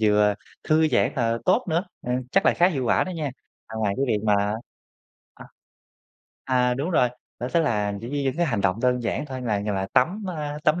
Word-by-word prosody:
vừa 105 -1 +4 0.3
thư 155 0 +3
giãn, 130 - +2
ờ, 115 -2 0
tốt 185 - +3
nữa, 170 +4 +1 0.2
ờ, 125 - -3 0.2
chắc 195 - +3
là - - +5
khá 175 +2 +4
hiệu 135 -8 -2
quả - - +3
đó 185 - -5
nha. 155 -5 -3 0.4
À, 110 - -10
ngoài 105 -2 0
cái 135 - +1
việc 105 -3 0
mà 105 -1 +4 1.0
à, - - -12 1.0
à, 125 -1 +2
đúng 140 +7 -2
rồi, 125 -8 +3 0.3
đó 125 - -2
sẽ 170 - +2
là, 105 -9 0
kiểu 115 +4 -7
như, 145 -1 -1
những 135 +2 -1
cái 175 -1 +2
hành 110 -7 0
động 95 -1 +1
đơn 125 -1 +2
giản 120 +5 -2
thôi 130 -2 -6
là 105 -4 0
nh 105 - -4
là 95 0 -1
tắm, 180 +12 +2
a, 150 0 -4
tắm 155 +3 +3
125 Hz, 230 wpm, -24 LUFS, 110-155 Hz, 1.0 s, là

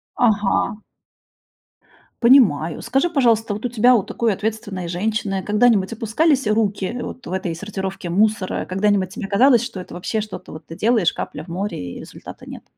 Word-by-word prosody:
Ага. 215 -1 +1 1.4
Понимаю. 195 - +4
Скажи, 275 +7 +1
пожалуйста, 230 -8 +2
вот 210 +4 -6
у - - 0
тебя, 245 +2 +4
у 215 - +2
такой 230 +1 -1
ответственной 205 -3 -4
женщины, 195 +1 -1
когда-нибудь 210 0 +2
опускались 255 +4 +1
руки 215 0 0
вот - - -7
в - - -7
этой 185 -3 -2
сортировке 190 -1 -5
мусора? 205 +1 +1
Когда-нибудь 195 0 +1
тебе 195 +2 -6
казалось, 240 +4 +4
что 200 - -6
это 180 - -9
вообще, 180 +5 -3
что-то 210 -3 -7
вот 155 0 -10
ты 165 - -9
делаешь, 215 -3 +2
капля - - -6
в - - -22
море, 170 - -4
и - - -8
результата - - -11
нет? - - -10
210 Hz, 165 wpm, -21 LUFS, 185-230 Hz, 1.4 s, Понимаю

